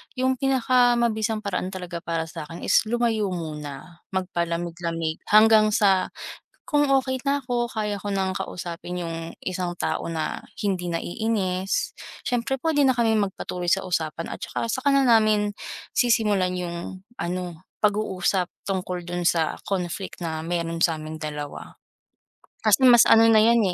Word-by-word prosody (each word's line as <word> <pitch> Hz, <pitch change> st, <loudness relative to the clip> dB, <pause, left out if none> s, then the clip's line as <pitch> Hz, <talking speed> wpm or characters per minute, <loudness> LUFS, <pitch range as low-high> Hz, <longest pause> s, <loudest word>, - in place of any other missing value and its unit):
yung 260 Hz, 0 st, +1 dB
pinakamabisang 240 Hz, -4 st, +2 dB
paraan 185 Hz, -2 st, -2 dB
talaga 180 Hz, -2 st, -5 dB
para 165 Hz, -1 st, -1 dB
sa'kin 165 Hz, +1 st, -8 dB
is -, -, +5 dB
lumayo 230 Hz, -3 st, +1 dB
muna, 155 Hz, +1 st, -7 dB
magpalamig-lamig, 170 Hz, -2 st, -2 dB
hanggang 215 Hz, 0 st, +6 dB
sa 195 Hz, -3 st, +3 dB, 0.6 s
kung 290 Hz, -1 st, +4 dB
okey 260 Hz, -1 st, +2 dB
na 280 Hz, 0 st, +1 dB
ako, 240 Hz, -1 st, -1 dB
kaya 210 Hz, -2 st, -2 dB
ko 205 Hz, -, -5 dB
ng 190 Hz, -1 st, 0 dB
kausapin 175 Hz, 0 st, -5 dB
yung 165 Hz, 0 st, -5 dB
isang 180 Hz, -1 st, -3 dB
tao -, -, -2 dB
na 160 Hz, -2 st, -3 dB, 0.2 s
hindi 185 Hz, -3 st, -1 dB
naiinis, 185 Hz, +1 st, -1 dB, 0.3 s
siyempre 245 Hz, +2 st, 0 dB
pwede 310 Hz, -3 st, +3 dB
na 260 Hz, -, +3 dB
kaming 220 Hz, -3 st, +2 dB
magpatuloy 180 Hz, -2 st, -5 dB
sa 190 Hz, +3 st, +3 dB
usapan. 165 Hz, -2 st, -2 dB
At -, -, -6 dB
saka, 230 Hz, -, -3 dB
saka 260 Hz, +2 st, -2 dB
na 275 Hz, -, +4 dB
namin 215 Hz, -4 st, +4 dB, 0.4 s
sisimulan 210 Hz, -6 st, +2 dB
yung 175 Hz, +1 st, -5 dB, 0.2 s
ano 175 Hz, -1 st, -4 dB, 0.2 s
pag-uusap 195 Hz, -3 st, +1 dB, 0.2 s
tungkol 180 Hz, -2 st, -3 dB
dun 175 Hz, 0 st, -2 dB
sa 165 Hz, -3 st, +1 dB
conflict 185 Hz, -1 st, -3 dB
na 160 Hz, -1 st, -3 dB
meron 170 Hz, -1 st, -2 dB
sa'ming 155 Hz, -2 st, 0 dB
dalawa. 150 Hz, -2 st, -6 dB, 0.9 s
Kasi 265 Hz, -, +4 dB
mas 240 Hz, -1 st, +7 dB
ano 225 Hz, 0 st, +7 dB
na 220 Hz, -, +6 dB
yan 230 Hz, +2 st, +5 dB
185 Hz, 140 wpm, -24 LUFS, 170-225 Hz, 0.9 s, mas